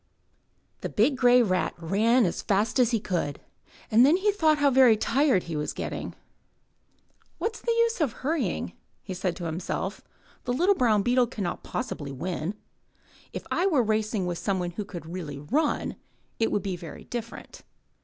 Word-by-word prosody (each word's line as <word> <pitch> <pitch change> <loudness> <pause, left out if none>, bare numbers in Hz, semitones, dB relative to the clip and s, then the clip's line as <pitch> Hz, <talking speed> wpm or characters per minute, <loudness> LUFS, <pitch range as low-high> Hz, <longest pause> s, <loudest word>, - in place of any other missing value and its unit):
The - - -4
big 250 +7 +2
grey 250 -1 +5
rat 185 -4 0
ran 215 +8 +3
as 170 - -2
fast 215 +5 +1
as 245 -3 +5
he 230 -2 +1
could. 170 -8 -2 0.5
Then 255 +10 +6
he 415 +2 +2
thought 315 -6 +3
how 290 -1 +3
very 255 -4 +6
tired 255 - +2
he 165 - -5
was 150 0 -2
getting. - - -5 0.6
* - - -40
'What's 450 0 -3
the 470 - 0
use 465 -3 +2
of 285 -6 +2
hurrying?" 300 +7 -2 0.3
he 190 - -5
said 185 -1 -2
to 175 - -7
himself. 180 +4 -3 0.4
*The 245 - 0
little 360 +10 +4
brown 220 - +2
beetle 245 +1 +3
can 220 -4 -5
not 175 - -3
possibly 145 - -4
win. 170 +6 -3 0.8
If - - -6
I 370 - +2
were 295 -10 +3
racing 215 -2 0
with 175 -1 -3
somebody 180 -3 -1
who 210 +3 -4
could 175 -5 -8
really 165 -4 -6
run, 275 - -1 0.4
it 225 - +1
would 205 - 0
be 195 -2 -2
very 170 -2 -9
different.' 230 -1 -7
220 Hz, 175 wpm, -27 LUFS, 180-260 Hz, 0.8 s, Then